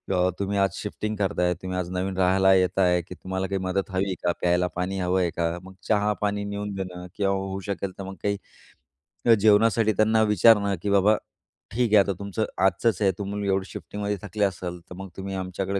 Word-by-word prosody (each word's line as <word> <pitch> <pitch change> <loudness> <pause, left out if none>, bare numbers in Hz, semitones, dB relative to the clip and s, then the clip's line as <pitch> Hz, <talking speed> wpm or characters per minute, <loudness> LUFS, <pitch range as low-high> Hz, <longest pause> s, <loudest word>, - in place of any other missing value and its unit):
अ, 90 0 +3
तुम्ही 100 0 -1
आज 100 0 +3
शिफ्टिंग 105 +1 -4
करताय, 95 -3 +1
तुम्ही 95 0 -4
आज 90 -1 -2
नवीन 95 +1 -2
राहायला 95 +1 +4
येत 95 0 +2
आहे 90 -2 +3
की 90 +2 -11
तुम्हाला 95 +1 -3
काही 100 +1 -2
मदत 95 +1 -1
हवी 95 +1 0
आहे 95 -2 -2
का? 90 - +2
प्यायला 90 0 +2
पाणी 90 +2 -2
हवं 90 +1 +1
आहे 90 - +1
का? 85 +1 -1
मग 95 0 -12
चहा, 105 -1 +2
पाणी 105 0 0
नेऊन 100 0 -4
देणं 90 -2 -6
किंवा 100 -1 +1
होऊ 95 0 -3
शकेल 100 -1 -3
तर 100 - -6
मग 95 0 -7
काही 100 -1 -3 0.8
जेवणासाठी 110 +1 +4
त्यांना 110 +2 +3
विचारणं, 105 -1 +4
की 105 - -2
बाबा 100 +2 +4 0.6
ठीक 120 +1 +1
आहे. - - +8
आता 100 - -2
तुमचं 100 +2 -2 0.2
आजचंच 110 +3 +1
आहे 100 -2 +4
तुम्ही 100 0 -3
एवढी 95 0 +1
शिफ्टिंगमध्ये 105 0 -4
थकले 105 0 -1
असाल. 90 -2 -4
तर 90 - -9
मग 95 +1 -8
तुम्ही 95 0 -5
आमच्याकडे 95 +1 -2
95 Hz, 205 wpm, -25 LUFS, 95-105 Hz, 0.8 s, आहे